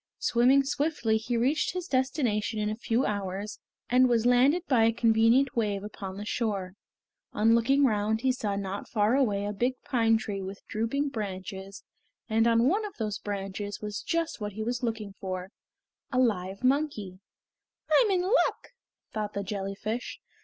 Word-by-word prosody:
Swimming 255 +4 +4
swiftly 275 -5 0
he 235 +2 -2
reached 270 +9 +1
his 365 -1 -4
destination 255 - 0
in 210 0 0
a - - -2
few 235 +3 0
hours, 200 0 -3 0.3
and 255 +1 +4
was 235 -1 +2
landed 260 +8 +4
by 235 -5 +4
a 225 - +4
convenient 230 +3 +3
wave 205 -4 0
upon 195 -2 -7
the 205 - -6
shore. 200 -5 -2 0.6
On 225 +2 +4
looking 270 +5 +4
round 215 -1 +1
he 260 0 +3
saw 210 -5 -2
not 200 0 -4
far 210 0 +2
away 205 -7 +1
a 205 - -2
big 245 +5 0
pine 225 -3 +3
tree 205 -3 -4
with 195 +1 -8
drooping 255 +7 -1
branches 195 -3 -6 0.4
and 225 +1 +2
on 230 +1 +4
one 400 +9 +2
of 415 -2 -7
those 215 -3 -3
branches 205 0 -5
was 210 -1 -5
just 335 -7 -2
what 205 -1 -4
he 220 +2 -4
was 245 +2 -2
looking 220 -4 -3
for 185 -1 -5 0.6
a 255 - -1
live 200 -5 0
monkey. 255 -9 0 0.7
"I'm 475 -4 +5
in 370 -2 +2
luck!" 415 +7 +1 0.4
thought 210 -1 -3
the 200 - -3
jellyfish. 200 +4 -4
225 Hz, 165 wpm, -28 LUFS, 205-255 Hz, 0.7 s, I'm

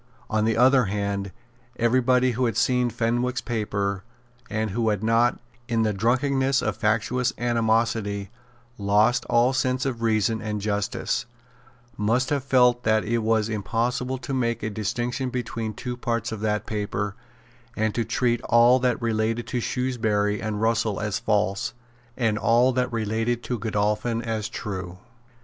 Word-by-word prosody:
On 110 0 +2
the 115 0 +1
other 130 +1 +5
hand, 100 0 -2 0.5
every 120 +2 +2
body 125 0 +3
who 125 +2 0
had 115 -3 -1
seen 125 +1 +2
Fenwick's 120 +2 0
paper, 100 -4 -2 0.5
and 110 -1 -1
who 115 +2 0
had 105 -1 -1
not, 115 +2 +3 0.3
in 115 -2 +1
the 110 -1 +1
drunkenness 130 +5 +1
of - - -1
factious 115 +3 0
animosity, 110 -4 0 0.5
lost 105 +5 +3
all 120 +2 +3
sense 130 0 0
of 125 -4 -2
reason 110 -1 +1
and 105 -1 -3
justice, 100 +1 -2 0.7
must 115 +6 +1
have 140 -2 0
felt 125 -2 +4
that 110 -1 +2
it 115 +2 0
was 110 -1 +1
impossible 115 +5 -1
to 135 - -6
make 115 -3 -1
a 110 - -2
distinction 120 +5 -2
between 120 -3 -3
two 125 +3 -5
parts 115 -1 -2
of 110 - -4
that 105 0 -1
paper, 105 -1 -3 0.6
and 110 -1 +1
to 115 - 0
treat 120 +1 0
all 120 +2 +5
that 125 -2 +1
related 115 0 -1
to 125 - -2
Shrewsbury 110 -5 0
and 105 -1 -3
Russell 110 -2 +1
as 105 -3 -2
false, 100 0 0 0.4
and 110 -4 +1
all 120 +3 +4
that 125 0 0
related 115 +1 -1
to 125 -2 -3
Godolphin 105 +2 -1
as 110 -2 -3
true. 95 -3 -5
115 Hz, 155 wpm, -25 LUFS, 105-125 Hz, 0.7 s, other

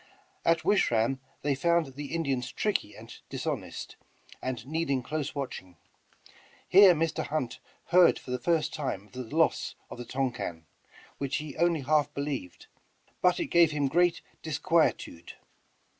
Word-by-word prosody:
At 165 0 +2
Wish 205 - +3
ram 120 +3 +1 0.2
they 145 0 +2
found 165 0 +1
the 145 +2 -6
Indians 135 -6 -1
tricky 205 - -1
and 115 +2 -11
dishonest, - - -5 0.4
and 125 -2 -4
needing 140 -3 -1
close 150 +2 -3
watching. 95 - -6 0.9
Here 190 -1 +8
Mr. 165 +1 -1
Hunt 145 -6 -2 0.3
heard 180 0 +6
for 125 - -9
the 125 - -1
first 155 +3 +1
time 130 -10 -3
of 105 - -24
the 130 - -5
loss 155 +7 +1 0.2
of - - -8
the 120 - -6
Tonquin, 120 -11 -3 0.5
which 140 -1 -2
he 150 -3 -4
only 170 -3 +2
half 150 +2 +2
believed, 140 -11 -4 0.6
but 180 -1 +3
it - - -3
gave 170 -2 +6
him 145 -2 0
great 175 +4 +2 0.2
disquietude. 160 - 0
145 Hz, 145 wpm, -29 LUFS, 125-165 Hz, 0.9 s, Here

